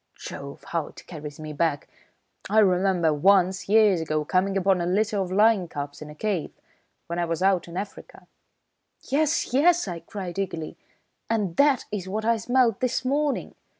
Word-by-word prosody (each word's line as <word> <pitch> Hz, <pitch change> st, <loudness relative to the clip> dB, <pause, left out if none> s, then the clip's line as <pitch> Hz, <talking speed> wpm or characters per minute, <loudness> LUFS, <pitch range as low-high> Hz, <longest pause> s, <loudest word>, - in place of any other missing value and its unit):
Jove, 140 Hz, 0 st, -9 dB
how 165 Hz, -3 st, -1 dB
it -, -, -14 dB
carries 150 Hz, -3 st, -9 dB
me 155 Hz, -1 st, -6 dB
back! 145 Hz, -1 st, -1 dB, 0.6 s
I 215 Hz, -, +1 dB
remember 185 Hz, -5 st, +3 dB
once, 190 Hz, +4 st, +3 dB
years 210 Hz, -5 st, +5 dB
ago, 155 Hz, -1 st, -1 dB
coming 190 Hz, +3 st, +1 dB
upon 190 Hz, -1 st, +2 dB
a 170 Hz, -, -1 dB
litter 205 Hz, +3 st, +1 dB
of 185 Hz, -2 st, -2 dB
lion 205 Hz, -2 st, +4 dB
cubs, 145 Hz, -2 st, -6 dB
in 150 Hz, -, -8 dB
a 150 Hz, -, -11 dB
cave, 195 Hz, -2 st, -2 dB, 0.6 s
when 170 Hz, +1 st, -4 dB
I 175 Hz, -, +1 dB
was 165 Hz, +2 st, -2 dB
out 190 Hz, -3 st, +2 dB
in 170 Hz, +1 st, -8 dB
Africa 200 Hz, +1 st, -8 dB, 0.4 s
" -, -, -52 dB
"Yes! 305 Hz, -1 st, +1 dB
Yes!" 335 Hz, +2 st, +4 dB
I 175 Hz, -2 st, -4 dB
cried 185 Hz, +1 st, -6 dB
eagerly. 165 Hz, -5 st, -4 dB, 0.5 s
"And 205 Hz, -7 st, -1 dB
that 280 Hz, -3 st, +4 dB
is 190 Hz, -3 st, -4 dB
what 215 Hz, +3 st, -3 dB
I 230 Hz, 0 st, +3 dB
smelt 245 Hz, -1 st, +2 dB
this 255 Hz, +1 st, -1 dB
morning. 285 Hz, +2 st, 0 dB
190 Hz, 180 wpm, -25 LUFS, 170-220 Hz, 0.6 s, years